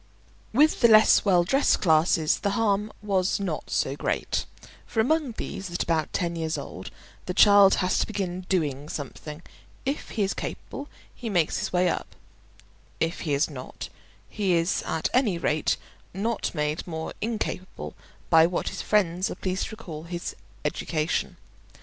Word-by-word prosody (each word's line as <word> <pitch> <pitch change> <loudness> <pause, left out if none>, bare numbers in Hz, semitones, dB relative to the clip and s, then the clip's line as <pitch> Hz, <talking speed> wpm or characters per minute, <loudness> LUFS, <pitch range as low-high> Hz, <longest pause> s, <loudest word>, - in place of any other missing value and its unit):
With 300 +7 +4
the 235 - +8
less 220 -1 +7
well 180 -3 +5
dressed 270 +11 +3
classes 160 -2 +3
the 200 - 0
harm 210 -1 +1
was 195 -2 +1
not 195 -2 -3
so - - 0
great; - - -1 0.4
for 225 - -3
among 280 +2 +2
these, 190 -1 -5
at 175 - -1
about 160 -2 0
ten 170 -2 -1
years 160 -1 -2
old, - - -7 0.4
the 180 - -2
child 200 -1 +7
has 185 - +1
to - - +1
begin 185 -4 -4
doing 150 -5 0
something: 150 +2 -7 0.4
if 275 +3 -2
he 215 - -1
is 195 - 0
capable 285 - -6 0.2
he 235 - -6
makes 175 -6 +1
his - - -3
way 180 0 +3
up; - - -3 0.8
if 165 +1 -1
he 150 -4 0
is 140 - +2
not, 130 -4 -8 0.4
he 200 -4 0
is 170 +1 +1
at 160 - 0
any 235 -8 +3
rate 155 -2 +1 0.4
not 220 -1 -1
made 150 +2 -1
more 160 -1 -4
incapable 215 -4 -4 0.4
by 165 -1 +7
what 175 - -2
his - - -5
friends 185 -3 +1
are - - -5
pleased 185 0 -2
to 220 - -8
call 165 -8 -8
his 175 0 -5 0.3
education. 155 -1 -1
180 Hz, 160 wpm, -26 LUFS, 160-210 Hz, 0.8 s, the